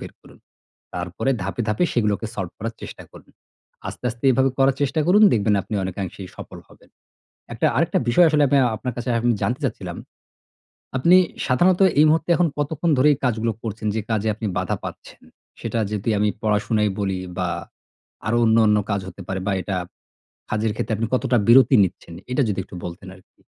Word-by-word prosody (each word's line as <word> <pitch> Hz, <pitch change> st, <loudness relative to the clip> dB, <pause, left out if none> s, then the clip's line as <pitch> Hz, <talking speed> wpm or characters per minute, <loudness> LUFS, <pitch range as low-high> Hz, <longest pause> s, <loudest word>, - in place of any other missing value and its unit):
বের -, -, -9 dB
করুন। -, -, -18 dB, 0.6 s
তারপরে 90 Hz, +8 st, -3 dB
ধাপে, 100 Hz, +5 st, -3 dB
ধাপে 105 Hz, +11 st, +1 dB
সেগুলোকে 105 Hz, -2 st, 0 dB
সলভ 95 Hz, -4 st, -4 dB
করার 115 Hz, +2 st, -4 dB
চেষ্টা -, -, -9 dB
করুন। -, -, -16 dB, 0.6 s
আস্তে, -, -, -8 dB
আস্তে 120 Hz, +4 st, -6 dB
এভাবে 130 Hz, +2 st, +2 dB
করার 135 Hz, 0 st, +4 dB
চেষ্টা 145 Hz, +3 st, 0 dB
করুন, 205 Hz, +4 st, +6 dB
দেখবেন 105 Hz, -1 st, +2 dB
আপনি -, -, -8 dB
অনেকাংশেই 95 Hz, 0 st, -5 dB
সফল -, -, -9 dB
হবেন। -, -, -21 dB, 0.7 s
একটা -, -, +1 dB
আরেকটা -, -, +2 dB
বিষয় 170 Hz, +8 st, +5 dB
আসলে 150 Hz, -1 st, +3 dB
আমি 140 Hz, -, +3 dB
আ -, -, +3 dB
আপনার 125 Hz, 0 st, -5 dB
কাছে 125 Hz, +1 st, -5 dB
আমি 120 Hz, +1 st, +1 dB
জানতে 125 Hz, +5 st, -1 dB
চাচ্ছিলাম। 95 Hz, -8 st, -4 dB, 1.0 s
আপনি 170 Hz, +8 st, +5 dB, 0.3 s
সাধারণত 175 Hz, +9 st, +3 dB, 0.2 s
এই 155 Hz, -, +7 dB
মুহূর্তে 160 Hz, +2 st, +1 dB
এখন 175 Hz, -1 st, +3 dB
কতক্ষণ 150 Hz, +3 st, -1 dB
ধরেই 150 Hz, +3 st, +5 dB
এই -, -, -19 dB
কাজগুলো 115 Hz, -1 st, 0 dB
করছেন, 110 Hz, -1 st, -4 dB
যে 110 Hz, -, 0 dB
কাজে 110 Hz, -1 st, 0 dB
আপনি 110 Hz, -1 st, -4 dB
বাধা -, -, -1 dB
পাচ্ছেন? -, -, -9 dB, 0.4 s
সেটা 115 Hz, -, -3 dB
যদি 105 Hz, +2 st, -2 dB
আমি 105 Hz, 0 st, +2 dB
পড়াশোনাই 105 Hz, 0 st, +1 dB
বলি 95 Hz, -2 st, -1 dB, 0.2 s
বা 90 Hz, -1 st, -1 dB, 0.8 s
আরও 120 Hz, +1 st, +1 dB
অন্য, 110 Hz, 0 st, +4 dB
অন্য 105 Hz, 0 st, +4 dB
কাজ 100 Hz, -1 st, 0 dB
হতে 95 Hz, +1 st, -10 dB
পারে, 95 Hz, 0 st, -3 dB
বা -, -, +1 dB
এটা 95 Hz, -, -3 dB, 0.8 s
কাজের 110 Hz, 0 st, 0 dB
ক্ষেত্রে 110 Hz, -, -2 dB
আপনি 115 Hz, +1 st, -1 dB
কতটা 130 Hz, -1 st, +1 dB
বিরতি 130 Hz, +2 st, +7 dB
নিচ্ছেন, 85 Hz, -2 st, -7 dB, 0.2 s
এটা 135 Hz, +2 st, +2 dB
যদি 100 Hz, -, -2 dB
একটু -, -, -14 dB
বলতেন 90 Hz, +2 st, -8 dB
আরকি? 95 Hz, -, -25 dB
115 Hz, 185 wpm, -22 LUFS, 100-130 Hz, 1.0 s, এই